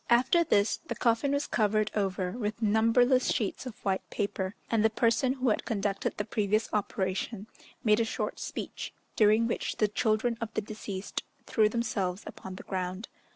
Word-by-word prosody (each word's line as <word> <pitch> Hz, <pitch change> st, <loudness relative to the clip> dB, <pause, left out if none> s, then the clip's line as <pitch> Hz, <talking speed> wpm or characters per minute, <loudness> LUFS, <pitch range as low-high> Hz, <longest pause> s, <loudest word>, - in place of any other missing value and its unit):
After 255 Hz, +8 st, +5 dB
this, 205 Hz, -9 st, +2 dB
the 330 Hz, -, -6 dB
coffin 235 Hz, +4 st, +2 dB
was 285 Hz, +1 st, +1 dB
covered 215 Hz, -1 st, +1 dB
over 190 Hz, -3 st, -1 dB
with 220 Hz, -1 st, -3 dB
numberless 230 Hz, +4 st, +4 dB
sheets 220 Hz, +4 st, -2 dB
of 235 Hz, -, -8 dB
white 190 Hz, -1 st, +1 dB
paper, 200 Hz, 0 st, -2 dB
and 225 Hz, -2 st, +2 dB
the 220 Hz, -, +5 dB
person 230 Hz, +3 st, +2 dB
who 260 Hz, -2 st, 0 dB
had 215 Hz, -, +1 dB
conducted 200 Hz, -2 st, -1 dB
the 210 Hz, -, -2 dB
previous 215 Hz, +1 st, +1 dB
operation 195 Hz, 0 st, -1 dB, 0.4 s
made 215 Hz, -1 st, +4 dB
a -, -, +4 dB
short 225 Hz, -, -3 dB
speech, -, -, -5 dB, 0.2 s
during 215 Hz, +1 st, +5 dB
which 230 Hz, -, -2 dB
the 215 Hz, -, +2 dB
children 220 Hz, +3 st, +1 dB
of 225 Hz, -1 st, -3 dB
the -, -, +1 dB
deceased 205 Hz, -2 st, -5 dB, 0.2 s
threw 215 Hz, -2 st, +3 dB
themselves 215 Hz, -5 st, -1 dB
upon 190 Hz, -1 st, -8 dB
the -, -, -9 dB
ground. 185 Hz, +2 st, -4 dB
215 Hz, 170 wpm, -29 LUFS, 200-230 Hz, 0.4 s, After